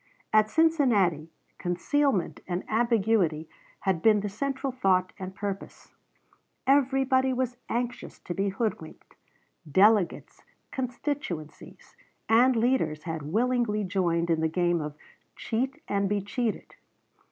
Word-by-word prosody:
At 215 Hz, 0 st, +5 dB
Cincinnati, 225 Hz, -, +2 dB, 0.3 s
concealment 195 Hz, -, 0 dB
and 180 Hz, 0 st, -2 dB
ambiguity 215 Hz, -8 st, +1 dB, 0.3 s
had 190 Hz, -4 st, 0 dB
been 215 Hz, 0 st, +4 dB
the 205 Hz, -, -3 dB
central 270 Hz, +5 st, -3 dB
thought 185 Hz, -7 st, +1 dB
and 190 Hz, 0 st, -7 dB
purpose. 200 Hz, -1 st, -6 dB, 0.7 s
Everybody 265 Hz, -1 st, +3 dB
was 250 Hz, -1 st, -2 dB
anxious 245 Hz, +1 st, -3 dB
to 175 Hz, -, -5 dB
be 195 Hz, +2 st, 0 dB
hoodwinked. 195 Hz, -5 st, -4 dB, 0.6 s
Delegates, 200 Hz, +2 st, +3 dB, 0.3 s
constituencies, 250 Hz, -, -5 dB, 0.3 s
and 245 Hz, +3 st, +5 dB
leaders 225 Hz, -11 st, +1 dB
had 160 Hz, -2 st, -4 dB
willingly 235 Hz, -1 st, +1 dB
joined 175 Hz, -3 st, 0 dB
in 160 Hz, -1 st, +1 dB
the 160 Hz, -, +2 dB
game 175 Hz, 0 st, +1 dB
of 150 Hz, -1 st, -5 dB, 0.4 s
"cheat 255 Hz, +4 st, -3 dB
and 200 Hz, -1 st, 0 dB
be 205 Hz, 0 st, +1 dB
cheated." 220 Hz, +3 st, -3 dB
210 Hz, 115 wpm, -27 LUFS, 180-250 Hz, 0.7 s, At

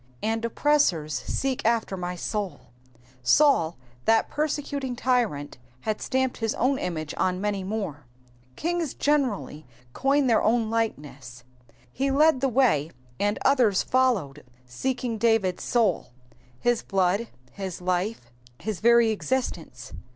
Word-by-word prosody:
^'' -, -, -30 dB, 0.2 s
And 225 Hz, +1 st, -1 dB
oppressor 235 Hz, -, +2 dB
$ 155 Hz, -, -9 dB
seek 260 Hz, -, -2 dB
after 230 Hz, -3 st, +1 dB
my 180 Hz, -1 st, -4 dB
muV^ 200 Hz, +2 st, -3 dB, 0.6 s
8aul, 175 Hz, -, +4 dB, 0.3 s
that 225 Hz, 0 st, +3 dB
persecuting 285 Hz, -3 st, -2 dB
tyrant, 235 Hz, -, -1 dB, 0.2 s
had 215 Hz, -1 st, -2 dB
stamped 260 Hz, -1 st, 0 dB
his 225 Hz, -2 st, -1 dB
own 265 Hz, +2 st, +1 dB
image 155 Hz, -4 st, -4 dB
on 180 Hz, 0 st, 0 dB
many 200 Hz, -1 st, -2 dB
more. 185 Hz, -, -4 dB, 0.5 s
Kings 340 Hz, -3 st, -2 dB
generally 255 Hz, -, 0 dB, 0.3 s
coin 275 Hz, +1 st, +2 dB
their 235 Hz, -3 st, +3 dB
own 225 Hz, -1 st, +1 dB
likeness. 145 Hz, -, -4 dB, 0.5 s
He 275 Hz, +1 st, 0 dB
led 285 Hz, 0 st, +4 dB
the 270 Hz, -, +2 dB
way, 225 Hz, -, +2 dB, 0.3 s
and 205 Hz, +1 st, +1 dB
others 245 Hz, -8 st, +4 dB
followed 205 Hz, -, +1 dB, 0.2 s
seeking 235 Hz, -, -3 dB
David^s 225 Hz, -5 st, +2 dB
soul, 220 Hz, -, 0 dB, 0.5 s
his 240 Hz, -1 st, +1 dB
blood, 195 Hz, +3 st, 0 dB, 0.2 s
his 190 Hz, -3 st, -6 dB
life, 180 Hz, -, -2 dB, 0.3 s
his 215 Hz, -3 st, -4 dB
very 235 Hz, 0 st, +5 dB
existence. 205 Hz, -, -3 dB
220 Hz, 130 wpm, -26 LUFS, 180-260 Hz, 0.6 s, very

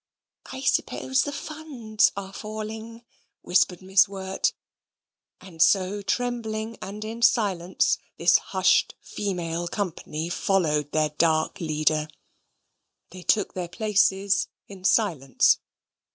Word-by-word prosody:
"I 265 Hz, 0 st, -6 dB
suppose 265 Hz, 0 st, +1 dB
the 290 Hz, -, -2 dB
funds 280 Hz, -9 st, -1 dB
are 195 Hz, -1 st, -6 dB
falling," 220 Hz, +2 st, -7 dB, 0.4 s
whispered 180 Hz, 0 st, +2 dB
Miss 190 Hz, +2 st, +5 dB
Wirt; 190 Hz, -1 st, -1 dB, 0.9 s
and 180 Hz, -4 st, -9 dB
so, 195 Hz, +3 st, +3 dB
trembling 225 Hz, 0 st, -2 dB
and 210 Hz, +2 st, -6 dB
in 225 Hz, +2 st, -6 dB
silence, 195 Hz, -7 st, +2 dB, 0.2 s
this 170 Hz, 0 st, +5 dB
hushed 185 Hz, -1 st, +2 dB
female 175 Hz, -4 st, -3 dB
company 170 Hz, -4 st, -4 dB
followed 155 Hz, -5 st, 0 dB
their 155 Hz, -1 st, +1 dB
dark 155 Hz, +1 st, +1 dB
leader. 155 Hz, -1 st, +1 dB, 1.0 s
They 185 Hz, +1 st, -10 dB
took 205 Hz, +3 st, +1 dB
their 180 Hz, -2 st, -4 dB
places 200 Hz, -1 st, +2 dB, 0.2 s
in 190 Hz, -2 st, -11 dB
silence. 175 Hz, -, +3 dB
195 Hz, 110 wpm, -25 LUFS, 175-220 Hz, 1.0 s, Miss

